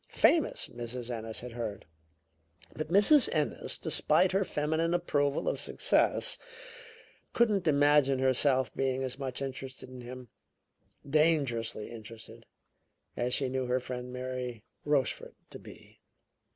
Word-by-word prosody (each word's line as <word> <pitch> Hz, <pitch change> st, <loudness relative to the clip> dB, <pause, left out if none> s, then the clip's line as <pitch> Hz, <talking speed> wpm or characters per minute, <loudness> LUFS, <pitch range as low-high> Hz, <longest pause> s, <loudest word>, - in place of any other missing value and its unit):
Famous, 330 Hz, -3 st, +2 dB
Mrs. 120 Hz, +1 st, -6 dB
Ennis 110 Hz, -1 st, -4 dB
had 125 Hz, 0 st, -8 dB
heard. 110 Hz, -4 st, -5 dB, 0.9 s
But 155 Hz, -, -4 dB
Mrs. 205 Hz, -, +5 dB
Ennis, -, -, -1 dB
despite 185 Hz, -, +2 dB
her 195 Hz, +1 st, +2 dB
feminine 160 Hz, +1 st, 0 dB
approval 145 Hz, -5 st, 0 dB
of -, -, 0 dB
success, -, -, +2 dB, 0.9 s
couldn't 210 Hz, -7 st, +2 dB
imagine 145 Hz, -2 st, +4 dB
herself 130 Hz, 0 st, +2 dB
being 135 Hz, 0 st, -1 dB
as 130 Hz, +1 st, -4 dB
much 135 Hz, -1 st, -3 dB
interested 130 Hz, -1 st, -6 dB
in 130 Hz, -1 st, -10 dB
him 125 Hz, 0 st, -9 dB, 0.8 s
dangerously 140 Hz, -8 st, +1 dB
interested 115 Hz, -1 st, -11 dB, 0.7 s
as 125 Hz, +1 st, +1 dB
she 135 Hz, -, 0 dB
knew 130 Hz, 0 st, -2 dB
her 125 Hz, +1 st, +1 dB
friend 125 Hz, 0 st, -6 dB
Mary 125 Hz, -3 st, -5 dB, 0.2 s
Rochefort 145 Hz, -3 st, -1 dB, 0.2 s
to -, -, -8 dB
be. -, -, -15 dB
130 Hz, 125 wpm, -30 LUFS, 125-150 Hz, 0.9 s, Mrs